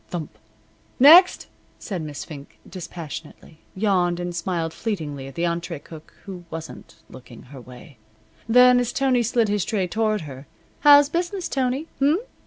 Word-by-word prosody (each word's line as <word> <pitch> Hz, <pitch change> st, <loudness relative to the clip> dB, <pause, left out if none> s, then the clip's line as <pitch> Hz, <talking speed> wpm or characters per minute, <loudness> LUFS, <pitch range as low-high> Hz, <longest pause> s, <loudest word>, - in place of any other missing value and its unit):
Thump! 170 Hz, -4 st, -6 dB, 0.6 s
"Next!" 335 Hz, +8 st, +7 dB, 0.3 s
said 190 Hz, -6 st, -6 dB
Miss 150 Hz, -2 st, -7 dB
Fink, 145 Hz, -3 st, -12 dB
dispassionately, 165 Hz, -3 st, -10 dB, 0.2 s
yawned, 185 Hz, -3 st, 0 dB
and 175 Hz, -1 st, -5 dB
smiled 165 Hz, -1 st, -3 dB
fleetingly 150 Hz, -11 st, -5 dB
at 135 Hz, -, -12 dB
the 170 Hz, -, -1 dB
entree 170 Hz, 0 st, -3 dB
cook 155 Hz, +2 st, -14 dB
who 185 Hz, -3 st, -9 dB
wasn't 160 Hz, -1 st, -9 dB
looking 125 Hz, -2 st, -14 dB
her 130 Hz, 0 st, -12 dB
way. 125 Hz, +3 st, -14 dB, 0.5 s
Then, 250 Hz, +1 st, +6 dB
as 245 Hz, -1 st, -1 dB
Tony 260 Hz, -2 st, +1 dB
slid 235 Hz, 0 st, +1 dB
his 205 Hz, -2 st, 0 dB
tray 200 Hz, -4 st, -1 dB
toward 215 Hz, +2 st, -1 dB
her: 135 Hz, -2 st, -10 dB, 0.3 s
"How's 290 Hz, -1 st, +7 dB
business, 350 Hz, +4 st, -3 dB
Tony? 265 Hz, +3 st, -2 dB
180 Hz, 145 wpm, -22 LUFS, 155-245 Hz, 0.6 s, Next